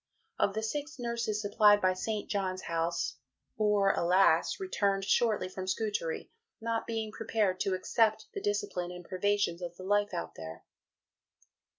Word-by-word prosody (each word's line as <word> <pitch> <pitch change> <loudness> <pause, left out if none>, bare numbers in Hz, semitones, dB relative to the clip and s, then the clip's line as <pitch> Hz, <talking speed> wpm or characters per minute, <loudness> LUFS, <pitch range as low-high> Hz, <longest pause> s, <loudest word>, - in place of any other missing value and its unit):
Of 200 - +2
the 220 - -1
six 290 +6 -3
nurses 235 -3 -2
supplied 205 0 +5
by 185 -2 +3
St. 210 +3 -3
John's 185 -2 -2
House, 165 -4 -1 0.4
"four, 210 -2 +3
alas! 175 - +3
returned 200 - 0
shortly 215 -3 +2
from 185 0 -6
Scutari, 190 -4 -2 0.3
not 230 0 -2
being 225 -2 -2
prepared 215 -4 0
to 190 0 +1
accept 220 +3 +1
the - - -4
discipline 205 -4 -1
and 180 -1 -9
privations 190 -2 0
of 175 -1 -5
the 185 - -9
life 205 +1 +2
out 175 - -4
there." 80 0 -9
205 Hz, 150 wpm, -31 LUFS, 185-220 Hz, 0.4 s, supplied